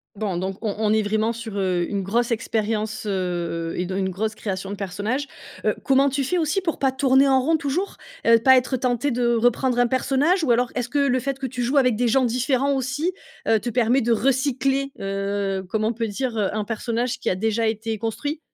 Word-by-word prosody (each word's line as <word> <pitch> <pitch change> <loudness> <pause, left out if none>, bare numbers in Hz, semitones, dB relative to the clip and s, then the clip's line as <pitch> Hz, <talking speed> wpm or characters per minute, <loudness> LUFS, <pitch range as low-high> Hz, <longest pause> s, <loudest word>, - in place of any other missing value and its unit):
Bon, 195 -3 -2
donc 190 +2 -3
on 215 -3 -1
on 215 -1 +2
est 215 0 +3
vraiment 220 +2 0
sur, 225 -3 -7
heu, 180 -2 +1
une 200 -1 -2
grosse 230 +5 0
expérience, 220 -1 -1
heu 175 -4 -2
et 180 - -1
de 190 +1 -4
une 190 -1 0
grosse 215 +4 -2
création 195 -2 -4
de - - -3
personnages. 210 +8 -3 0.4
Heu, - - +2
comment 275 +1 +4
tu 275 +1 -1
fais 350 +7 0
aussi 320 +4 0
pour 335 -4 -2
pas 270 -1 +2
tourner 265 +1 +4
en 265 -1 +4
rond 320 +5 +2
toujours? 315 +7 -2 0.3
Heu, 230 0 +6
pas 260 +3 +6
être 255 +1 0
tenté 250 +2 0
de 240 -1 +1
reprendre 245 +2 +2
un 245 - +4
personnage? 285 +8 +1
Ou 280 - 0
alors, 240 +1 +2
est-ce 245 -1 -3
que 290 - -2
le 275 -3 +2
fait 275 +1 -3
que 270 - -5
tu 250 0 -4
joues 255 +4 +1
avec 250 -4 +4
des 245 +2 +1
gens 255 +3 +3
différents 255 +3 +1
aussi. 270 +6 -1 0.4
Heu, 225 - +4
te 240 - -4
permet 245 +2 +2
de 235 - 0
recycler, 270 +2 +1
heu, 195 0 -2
comme 215 +2 -1
on 220 +2 +1
peut 230 0 -2
dire, 235 +3 -3
heu, 205 -3 +1
un 215 - -1
personnage 235 +3 -2
qui - - -1
a - - +1
déjà 220 +3 0
été 220 0 -2
construit? 285 +8 -3
235 Hz, 225 wpm, -23 LUFS, 210-265 Hz, 0.4 s, Heu